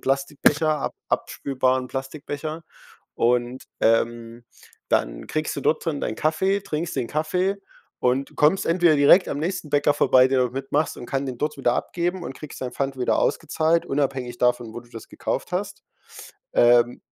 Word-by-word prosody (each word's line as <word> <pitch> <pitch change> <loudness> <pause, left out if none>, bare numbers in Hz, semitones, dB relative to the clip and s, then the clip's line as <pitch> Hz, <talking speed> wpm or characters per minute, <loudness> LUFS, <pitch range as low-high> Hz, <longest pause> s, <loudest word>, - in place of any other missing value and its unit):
Plastikbecher, 145 +3 +1
ab - - -3
abspülbaren 130 -1 0
Plastikbecher, 145 +4 -6 0.5
und, 120 +2 0 0.2
ähm, 115 +1 0 0.4
dann - - 0
kriegst 155 0 -2
du - - -3
dort 155 - +1
drin 150 -4 -1
dein 110 - -3
Kaffee, 190 +6 +1
trinkst 165 -3 -4
den 125 -3 -1
Kaffee 180 +7 0 0.4
und 130 +2 0
kommst 155 +6 +3
entweder 170 -2 +4
direkt 145 +6 +6
am 140 - -3
nächsten 165 -1 -3
Bäcker 145 0 +3
vorbei, 130 0 +5
der 130 -1 +2
dort 125 -1 0
mitmachst 135 +3 -1
und 120 - -8
kann 135 0 -2
den 125 -2 -5
dort 150 +2 -2
wieder 125 -3 +1
abgeben 175 +4 -2
und 135 - -6
kriegst 150 - -10
deinen 125 -1 -4
Pfand 135 0 -3
wieder 125 - +1
ausgezahlt, 160 +1 +1
unabhängig 135 -3 -2
davon, 120 -2 +1
wo - - -6
du 120 0 -21
das 115 -2 -10
gekauft - - -4
hast. - - -4 0.7
Ähm, 120 0 +4
140 Hz, 165 wpm, -23 LUFS, 125-155 Hz, 0.7 s, direkt